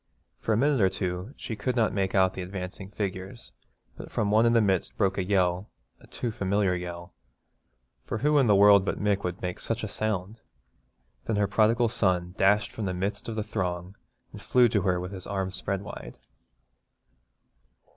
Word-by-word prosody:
For - - -2
a 105 - +3
minute 140 0 +2
or 95 - +5
two 90 +6 -4
she 115 - -5
could 125 +4 -2
not 115 -3 +2
make 95 -1 -1
out 95 -1 +4
the 95 - -5
advancing 95 +1 -6
figures, 100 +1 -5 0.4
but - - -9
from 100 -1 -1
one 110 +2 +5
in 115 - +3
the 115 - +5
midst 95 -4 0
broke 100 -2 +1
a - - +1
yell, 90 0 +1 0.3
a - - -18
too 120 - -4
familiar 100 -3 0
yell, 85 0 -6 0.9
for - - -4
who 150 +5 +3
in 135 - +3
the 105 - +5
world 100 0 +7
but - - -2
Mick 105 -1 +1
could 90 -1 -5
make 90 -1 -3
such 115 +1 0
a - - -1
sound? 105 0 -3 0.9
Then 115 - -1
her 105 0 +2
prodigal 115 +3 +3
son 90 -6 0
dashed 105 +3 +3
from 110 - -5
the 90 -1 -2
midst 100 +5 -3
of 115 - -4
the 110 - -1
throng 90 -2 -3 0.4
and - - -10
flew 125 -1 +4
to 105 -3 +1
her 90 -2 +1
with 90 +1 -5
his 95 -2 -7
arms 95 -1 -2
spread 95 +1 -3
wide. 105 - -9
100 Hz, 195 wpm, -27 LUFS, 95-110 Hz, 0.9 s, world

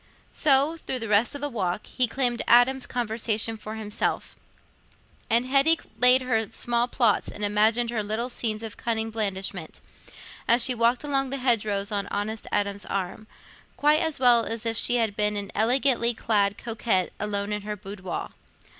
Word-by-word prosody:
So, 290 +2 +2
through 265 -4 -4
the 225 -2 -5
rest 210 +6 +2
of 285 - -7
the 290 - -1
walk, 200 -5 -3
he 250 -1 0
claimed 240 0 -1
Adam's 250 +2 +4
conversation 225 -1 -2
for 215 0 -8
himself, 210 -1 -3 0.9
and 235 +2 +3
Hetty 275 +5 +4 0.2
laid 250 +2 +7
her 225 -4 -1
small 235 +1 0
plots 235 -4 +1
and 210 - -7
imagined 220 +3 +2
her 225 -2 -1
little 215 +4 -3
scenes 225 -3 -2
of 220 -2 -7
cunning 225 -1 -2
blandishment, 195 -6 -4 0.7
as 235 +1 +5
she 255 - +2
walked 235 +2 +1
along 275 -2 -1
by 275 - -3
the 255 - -8
hedgerows 210 -4 +1
on 200 -1 -2
honest 210 +2 -4
Adam's 200 0 -2
arm, 195 +2 -4 0.5
quite 300 +1 +3
as 320 -4 -1
well 240 -2 +5
as 225 0 -4
if 230 0 -1
she 240 - +2
had 225 -4 0
been 210 0 0
an 200 -1 -5
elegantly 240 +1 +1
clad 205 -3 0
coquette 220 -5 -1
alone 205 0 -2
in 210 - -3
her 210 +1 -5
boudoir. 195 -2 -7
225 Hz, 170 wpm, -25 LUFS, 210-245 Hz, 0.9 s, laid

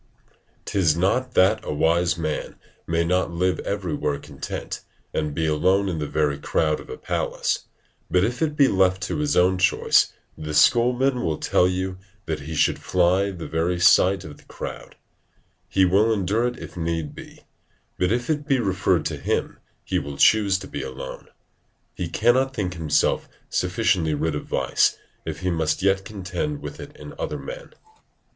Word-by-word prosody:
'Tis 85 -6 +2
not 125 +8 0
that 95 +4 +5
a - - -4
wise 85 +3 +2
man 80 -2 -3 0.3
may 85 0 +1
not 90 +1 +1
live 90 +2 0
everywhere 80 -7 -2
content, 70 -1 -6 0.3
and 75 -2 -2
be 80 - 0
alone 95 +6 +2
in 85 -4 -2
the 75 - -2
very 75 -2 0
crowd 75 +1 0
of - - -12
a - - -6
palace; - - -2 0.4
but 90 +1 +3
if 120 +7 -1
it 155 -2 0
be 140 -2 +5
left 95 -2 +2
to 105 - -2
his 150 -1 +1
own 90 +1 +4
choice, 90 - +3 0.2
the 75 0 -5
schoolman 125 - +3
will 80 -2 -1
tell 90 - +2
you 95 0 -2 0.3
that 80 -1 -2
he 80 +3 -6
should - - +2
fly 90 +2 +2
the 90 -4 -7
very 85 +2 0
sight 95 +2 +5
of 75 -2 -10
the - - -20
crowd: - - -8 0.7
he 95 -1 +4
will 100 +5 +3
endure 110 +3 +1
it 125 - -4
if 85 -1 -10
need 80 -3 -2
be; - - -12 0.6
but 90 +1 +2
if 120 +1 0
it 150 -2 -1
be 135 -3 +3
referred 95 -5 +1
to 75 -1 -2
him, 70 - -2 0.2
he - - 0
will 70 0 -7
choose 100 0 +4
to 95 0 -8
be 70 - -5
alone. 65 0 -7 0.7
He 90 - -4
cannot 125 +8 +2
think 90 -4 -2
himself 80 -4 +1 0.2
sufficiently 90 -4 +1
rid 80 +2 -1
of 75 - -4
vice, - - +2 0.3
if 80 +1 -5
he 90 0 0
must 80 +1 0
yet 95 0 +2
contend 100 +9 -4
with - - -7
it - - -10
in - - -10
other - - -3
men. - - -9
90 Hz, 175 wpm, -24 LUFS, 80-100 Hz, 0.7 s, that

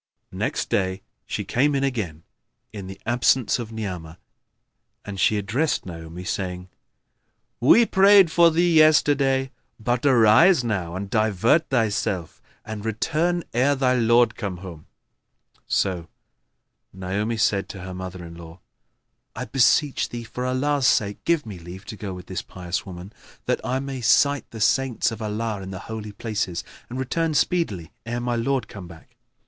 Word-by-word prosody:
Next - - -2
day 95 0 0 0.2
she - - -3
came 140 +4 +1
again, 110 - -2 0.5
in 100 -3 -7
the 95 0 -9
absence 120 +1 +2
of 115 -2 -6
Ni'amah, 90 -7 -6 0.9
and 100 -2 -6
she 105 +3 +3
addressed 125 +10 -1
Naomi, 85 0 -8
saying, 90 -1 -4 0.9
"We 225 - +6
prayed 195 -3 +6
for 170 0 +6
thee 170 +1 +2
yesterday; 140 -4 +4 0.3
but 120 +2 -1
arise 130 - +5
now 95 -7 -2
and 95 +2 -4
divert 110 - +2
thyself 105 -8 -1 0.2
and 110 -1 -6
return 160 +10 0
ere 130 +5 +3
thy 130 -2 +2
lord 120 0 +3
come 100 -5 -4
home." 85 -4 -10 0.8
So 90 -4 0 0.8
Naomi 100 +5 -3
said 105 -2 +1
to 95 - -8
her 95 0 -7
mother 95 -1 -7
in 85 - -10
law, 85 +1 -12 0.8
"I - - -4
beseech 140 +2 +2
thee, 120 -1 -6
for 125 +3 -5
Allah's 135 +1 +1
sake, 100 -1 +1
give 165 -3 +1
me 100 -5 -8
leave 90 +4 -10
to 110 - -7
go 100 -1 -6
with 90 - -10
this 95 - -4
pious 90 +1 -5
woman, 90 +2 -9 0.3
that - - 0
I 130 - -1
may 135 -1 -5
sight 140 +5 +3
the 110 - -8
saints 130 +2 +2
of 115 0 -7
Allah 110 -1 -3
in 95 - -7
the 95 - -6
Holy 110 +2 -7
Places, 105 -5 -3 0.3
and 125 - -6
return 155 +5 -1
speedily 110 - 0
ere 120 +1 -3
my 120 0 -1
lord 130 +3 -1
come 95 -4 -10
back." 80 -3 -15
110 Hz, 155 wpm, -23 LUFS, 95-135 Hz, 0.9 s, We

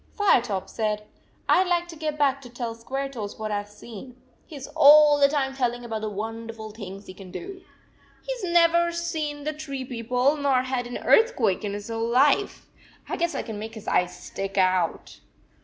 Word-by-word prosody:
Firetop 235 - +2
said: 210 -1 -2 0.2
" - - -36
I 370 - +5
d 370 - -5
like 345 -1 +1
to 335 - -8
get 305 -1 -3
back 275 -2 +2
to 250 - -11
tell 235 -1 -4
Squaretoes 255 -2 -5
what 215 -1 -4
I 205 -1 0
ve 205 - -15
seen. 225 +3 -11 0.3
He 315 - -10
s 275 -1 -7
all 295 -1 +8
the 280 - +6
time 270 -2 -1
telling 245 -2 -1
about 220 -2 -4
the 215 - -2
wonderful 225 +1 -6
things 200 -2 -9
he 185 - -10
can 190 0 -12
do. 370 - -8 0.6
He - - -3
s - - -9
never 340 0 +4
seen 310 -4 -3
the 305 +1 -2
tree 275 -4 -6
people 250 +4 0
nor 275 -3 +2
had 255 -2 -2
an 245 - -5
earthquake 450 - +3
in 205 -1 -3
his 205 +2 -6
whole 225 0 -2
life. 280 +10 +2 0.4
I - - -2
guess 340 0 -1
I - - -2
can 220 -3 -6
make 220 +2 -7
his 220 - -10
eyes 180 0 +1
stick 195 0 -6
out." 185 -3 +1
250 Hz, 205 wpm, -25 LUFS, 215-300 Hz, 0.6 s, all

